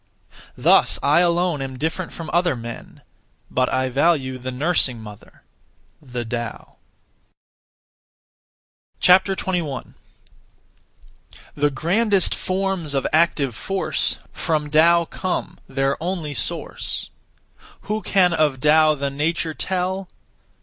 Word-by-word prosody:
(Thus) - - +4
I 145 +4 +4
alone 175 -3 +2
am 135 -1 -5
different 160 +5 -3
from 165 -2 -7
other 175 -3 +2
men, 115 0 -9 0.5
but 130 0 +1
I 130 0 0
value 135 -2 +1
the 130 +1 -5
nursing 135 -3 +1
mother 105 -2 -13 0.6
(the 125 -4 -5
Tao). 120 0 -6 2.2
21. 180 -5 +2 1.6
The 145 0 +1
grandest 195 +7 +1
forms 185 -5 -2
of 135 - 0
active 155 -5 +2
force 195 - -1
From 150 -3 -1
Tao 170 +2 +5
come, 185 +2 -4
their 135 +1 -1
only 170 -4 -3
source. - - -4 0.7
Who 215 +1 -3
can 180 -4 +3
of 150 -5 +1
Tao 155 +2 +5
the 140 -1 -2
nature 160 +3 -1
tell? 185 +2 -2
155 Hz, 105 wpm, -22 LUFS, 135-180 Hz, 2.2 s, Tao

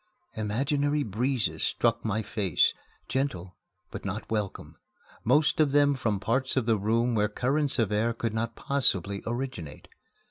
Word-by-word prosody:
Imaginary 140 +7 0
breezes 120 +3 -1
struck 115 -1 +1
my 110 0 -1
face, 105 -4 +2 0.3
gentle, 95 -10 -2 0.4
but - - -7
not 100 +2 -4
welcome, 105 -3 -3 0.5
most 150 +7 +3
of 145 -3 +3
them 145 0 +5
from 110 -6 -1
parts 130 +6 0
of 130 - +2
the 115 -2 +2
room 115 +4 +1
where 105 -2 +2
currents 135 +6 0
of 110 -4 +1
air 110 +3 +2
could 115 -1 -3
not 115 +1 -2
possibly 100 - +1
originate. 120 - -5
115 Hz, 145 wpm, -28 LUFS, 105-135 Hz, 0.5 s, them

